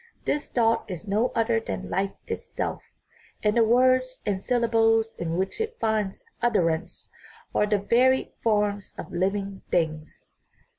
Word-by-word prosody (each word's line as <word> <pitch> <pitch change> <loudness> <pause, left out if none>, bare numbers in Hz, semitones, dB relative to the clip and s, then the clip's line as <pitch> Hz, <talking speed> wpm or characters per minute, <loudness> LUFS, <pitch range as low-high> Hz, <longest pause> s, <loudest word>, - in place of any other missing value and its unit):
This 295 - -1
thought 230 -2 +2
is 185 +2 -6
no 215 +5 +2
other 230 0 +2
than 90 - -5
life 195 +1 -1
it - - -3
self, - - -4 0.6
and 210 +1 +2
the 235 - +5
words 255 +2 +3
and 195 -2 -1
syllables 225 -2 +2
in 165 0 -2
which 190 - -1
it 445 +1 -3
finds 215 -3 -1 0.2
utterance 175 -9 0 0.4
are 210 - +2
the 210 0 +2
varied 250 +6 +3
forms 205 -2 0
of 160 - -7
living 195 +2 -1
things." 155 -2 -2
215 Hz, 145 wpm, -26 LUFS, 190-235 Hz, 0.6 s, the